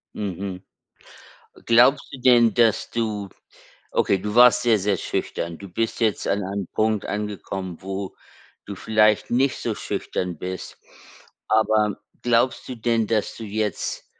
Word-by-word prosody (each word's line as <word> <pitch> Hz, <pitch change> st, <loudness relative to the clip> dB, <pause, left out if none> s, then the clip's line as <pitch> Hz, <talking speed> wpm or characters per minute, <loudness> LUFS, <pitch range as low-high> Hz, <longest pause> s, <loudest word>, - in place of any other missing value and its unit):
Mhm. 95 Hz, -2 st, -5 dB, 1.0 s
Glaubst 125 Hz, +5 st, +4 dB
du 130 Hz, -, -8 dB
denn, 120 Hz, -3 st, +5 dB
dass 115 Hz, -3 st, +2 dB
du 105 Hz, -4 st, -2 dB, 0.6 s
okay, 100 Hz, -, +2 dB
du 105 Hz, +2 st, -4 dB
warst 125 Hz, 0 st, +7 dB
sehr, 115 Hz, -3 st, +4 dB
sehr 100 Hz, 0 st, 0 dB
schüchtern. 85 Hz, 0 st, -3 dB
Du 100 Hz, -, -10 dB
bist 115 Hz, +7 st, -2 dB
jetzt 110 Hz, -3 st, 0 dB
an 100 Hz, 0 st, 0 dB
einem 100 Hz, -1 st, -4 dB
Punkt 110 Hz, -1 st, +1 dB
angekommen, 95 Hz, -3 st, -4 dB
wo 95 Hz, 0 st, -5 dB, 0.5 s
du 100 Hz, -, -7 dB
vielleicht 110 Hz, +1 st, +2 dB
nicht 130 Hz, +2 st, +2 dB
so -, -, -2 dB
schüchtern 90 Hz, -3 st, -4 dB
bist, 90 Hz, +1 st, -6 dB, 0.7 s
aber 110 Hz, -1 st, +2 dB, 0.3 s
glaubst 120 Hz, +1 st, +1 dB
du 130 Hz, -, -5 dB
denn, 115 Hz, -1 st, 0 dB
dass 110 Hz, -2 st, -1 dB
du 115 Hz, -, -7 dB
jetzt- 105 Hz, -1 st, -3 dB
105 Hz, 140 wpm, -23 LUFS, 100-115 Hz, 1.0 s, warst